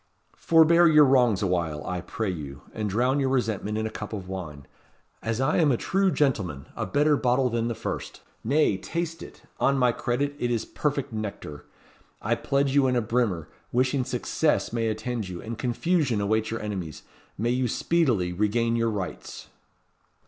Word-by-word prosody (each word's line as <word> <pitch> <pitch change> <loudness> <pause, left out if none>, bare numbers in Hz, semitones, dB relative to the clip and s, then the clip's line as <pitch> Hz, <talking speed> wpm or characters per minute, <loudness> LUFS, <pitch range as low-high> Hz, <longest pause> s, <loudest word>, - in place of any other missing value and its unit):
"Forbear 170 +1 +5
your 150 -2 +7
wrongs 125 -7 +3
awhile, 85 -5 -1
I 90 -1 -3
pray 110 +1 -3
you, 70 -5 -7
and 105 -1 -2
drown 125 +7 +1
your 135 -1 +1
resentment 110 -5 -1
in 110 - -1
a 110 - -3
cup 105 0 -7
of 95 -3 -5
wine. 80 -7 -7 0.6
As 115 0 -2
I 135 +3 +2
am 155 -4 +4
a 120 - +2
true 195 +7 +1
gentleman! 100 - 0
a - - -3
better 150 +1 +3
bottle 125 -1 +1
than 115 0 0
the 120 - -2
first! - - -5 0.2
Nay, 135 -4 +2
taste 165 - -4
it. - - -12 0.2
On 140 0 +3
my 125 -2 +4
credit, 135 +4 -1
it 120 - 0
is 120 -2 -1
perfect 140 -5 -2
nectar. 100 -9 -6 0.5
I 110 - 0
pledge 140 +3 0
you 140 -2 +4
in 125 - +1
a 120 - +2
brimmer; 110 -8 0 0.2
wishing 130 +2 +1
Success 120 - 0
may 115 -1 0
attend 110 -1 -3
you, 90 -1 -6
and 115 +1 -6
Confusion 125 - 0
await 110 +2 0
your 115 - -3
Enemies! 95 -7 -5 0.3
May 115 +3 0
you 125 0 +1
speedily 120 - +1
regain 115 +4 +1
your 115 0 +1
Rights!" 100 -4 -6
115 Hz, 180 wpm, -26 LUFS, 105-135 Hz, 0.6 s, your